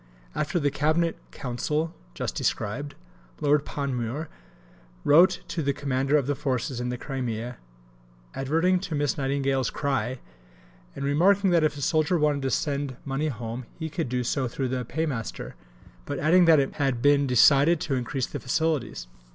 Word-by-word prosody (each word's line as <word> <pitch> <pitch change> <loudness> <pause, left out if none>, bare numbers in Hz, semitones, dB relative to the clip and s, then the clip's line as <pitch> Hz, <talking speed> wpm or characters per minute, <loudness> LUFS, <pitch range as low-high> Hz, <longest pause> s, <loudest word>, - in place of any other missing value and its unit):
After 175 +4 -1
the 145 -2 +1
Cabinet 155 +3 +1
Council, 150 +6 -2 0.2
just - - -3
described, 140 +8 -2 0.4
Lord 145 0 +2
Panmure 140 +1 -3 0.7
wrote 170 +6 +5
to 165 - -2
the 140 -1 0
Commander 135 +1 +1
of 140 - 0
the 145 - 0
Forces 130 -3 -2
in 125 - -2
the 125 - -3
Crimea, 125 -3 -4 0.8
adverting 165 +7 +1
to 180 -4 -4
Miss 145 -3 0
Nightingale's 135 -2 0
"cry," 130 -3 -1 0.8
and 140 - -4
remarking 185 +7 +3
that 170 -2 +4
if 150 -1 +1
a - - -6
soldier 155 +4 +2
wanted 150 -2 +1
to 135 - -1
send 140 -1 -1
money 140 +3 -1
home 120 -2 -5
he 160 -2 -5
could 160 -5 -2
do 125 0 -1
so 130 +2 0
through 130 +2 -3
the 125 0 -2
Paymaster, 140 -6 -3 0.5
but - - -3
adding 175 +4 +5
that 160 -2 +6
it 135 - -1
had 135 -5 0
been 145 -1 +4
decided 140 +6 +5
to 155 -6 -2
increase 130 +1 -1
the - - -6
facilities. 140 - -1
140 Hz, 160 wpm, -26 LUFS, 130-155 Hz, 0.8 s, that